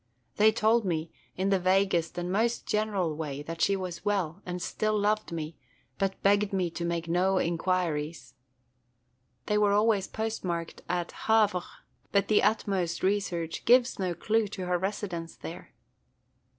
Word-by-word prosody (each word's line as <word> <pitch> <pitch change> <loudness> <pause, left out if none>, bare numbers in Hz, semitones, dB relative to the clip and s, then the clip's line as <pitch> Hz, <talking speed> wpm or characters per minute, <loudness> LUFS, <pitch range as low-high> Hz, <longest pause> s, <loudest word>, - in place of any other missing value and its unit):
They 215 +1 +6
told 220 +2 +3
me, 165 -4 -2 0.3
in 190 +2 +1
the 195 - +3
vaguest 185 -2 +2
and 175 +1 -2
most 230 +4 +1
general 200 -7 0
way, 145 -2 -4
that 165 +2 -6
she 200 - +3
was 180 -3 -5
well, 195 -4 -1
and 180 0 -3
still 215 +4 -1
loved 210 -1 0
me, 160 -1 -5 0.4
but 195 -1 -1
begged 205 +1 +3
me 180 -3 0
to 170 - -5
make 170 -1 -2
no 185 +3 +2
inquiries. 165 -6 -1 1.1
They 210 0 +1
were 205 -1 +3
always 210 -2 +3
postmarked 185 -7 -3
at 175 -1 -1 0.2
Havre; 215 -4 +4 0.5
but 200 -1 +2
the 215 - +5
utmost 190 -6 0
research 180 -4 -1
gives 245 -1 +4
no 180 -2 -1
clew 220 +3 +1
to 190 -2 -6
her 180 0 +1
residence 185 -3 -4
there." - - -9
185 Hz, 150 wpm, -29 LUFS, 170-205 Hz, 1.1 s, They